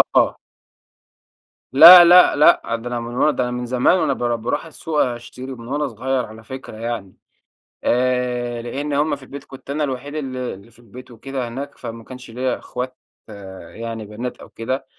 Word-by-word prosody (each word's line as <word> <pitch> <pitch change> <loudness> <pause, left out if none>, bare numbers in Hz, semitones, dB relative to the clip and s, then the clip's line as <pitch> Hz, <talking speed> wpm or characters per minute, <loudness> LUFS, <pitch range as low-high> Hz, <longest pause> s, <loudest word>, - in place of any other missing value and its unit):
آه. - - +3 1.4
لأ، 175 +6 +11
لأ، 180 +1 +7
لأ. 150 - +5
ده 115 +1 -7
أنا 120 -1 -3
من 120 +1 -7
وأنا 150 +4 +3
ده 125 -2 -1
أنا 125 - -3
من 125 0 -4
زمان 125 +8 +2
وأنا 155 -6 +1
بار 120 -2 -1
باروح 125 +7 -3
السوق 160 -1 -4
أشتري 125 +2 -7
ومن 120 -3 -9
وأنا 145 +3 -1
صغير 130 +2 -2
على 110 +1 -13
فكرة 130 -2 -9
يعني. 115 -4 -5 0.7
آآ 125 -1 0
لإن 140 +5 -4
هم 145 +2 +1
في 140 - -15
البيت 140 +1 -10
كنت 135 -1 -14
أنا 150 +2 -1
الوحيد 140 +1 -4
اللي 130 -4 -4
اللي 100 +4 -14
في 115 - -24
البيت 120 +2 -13
وكده 130 +2 -5
هناك، 140 +4 -7
فما 115 0 -8
كانش 125 0 -11
ليّا 125 +2 -2
إخوات 125 +1 -6 0.8
يعني 115 -1 -6
بنات 110 +4 -6
أو - - -14
كده. 130 +4 -4
125 Hz, 180 wpm, -20 LUFS, 120-140 Hz, 1.4 s, لأ